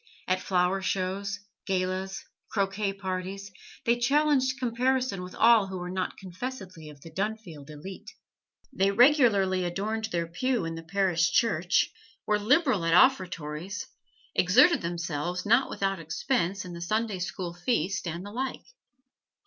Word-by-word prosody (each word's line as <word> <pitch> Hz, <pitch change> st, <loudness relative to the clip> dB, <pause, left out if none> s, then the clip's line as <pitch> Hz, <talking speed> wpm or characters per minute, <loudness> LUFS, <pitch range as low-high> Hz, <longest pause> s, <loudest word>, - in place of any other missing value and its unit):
At 185 Hz, 0 st, +1 dB
flower 185 Hz, +1 st, +1 dB
shows, 195 Hz, +1 st, -2 dB, 0.3 s
galas, 190 Hz, 0 st, -2 dB, 0.2 s
croquet 200 Hz, 0 st, 0 dB
parties, 195 Hz, 0 st, -5 dB, 0.3 s
they 235 Hz, +1 st, +2 dB
challenged 275 Hz, 0 st, +2 dB
comparison 250 Hz, -3 st, 0 dB
with 180 Hz, 0 st, -8 dB
all 225 Hz, -3 st, +5 dB
who 190 Hz, -1 st, -5 dB
were 180 Hz, 0 st, -5 dB
not 185 Hz, 0 st, -3 dB
confessedly 185 Hz, -4 st, -7 dB
of 145 Hz, -2 st, -14 dB
the 165 Hz, -, -11 dB
Dunfield 190 Hz, -6 st, -4 dB
elite. 155 Hz, +6 st, -9 dB, 0.6 s
They 195 Hz, -4 st, +2 dB
regularly 205 Hz, -6 st, +4 dB
adorned 210 Hz, +5 st, -2 dB
their 170 Hz, -5 st, -2 dB
pew 220 Hz, +5 st, -1 dB
in 165 Hz, -, -3 dB
the 165 Hz, -, -6 dB
parish 175 Hz, 0 st, +1 dB
church, 185 Hz, -7 st, +2 dB, 0.3 s
were 210 Hz, -1 st, +2 dB
liberal 255 Hz, -, +3 dB
at 165 Hz, 0 st, +3 dB
offertories, 185 Hz, -, +1 dB, 0.5 s
exerted 350 Hz, -2 st, +5 dB
themselves, 170 Hz, +1 st, -3 dB
not 235 Hz, +5 st, +4 dB
without 195 Hz, -1 st, -1 dB
expense, 185 Hz, -, -1 dB
in 180 Hz, -, -8 dB
the 170 Hz, -, -8 dB
Sunday 215 Hz, +2 st, -1 dB
school 180 Hz, -1 st, -4 dB
feast, 175 Hz, -1 st, -1 dB
and 170 Hz, +3 st, -4 dB
the 205 Hz, -, -8 dB
like. 260 Hz, +4 st, -4 dB
195 Hz, 140 wpm, -28 LUFS, 175-220 Hz, 0.6 s, all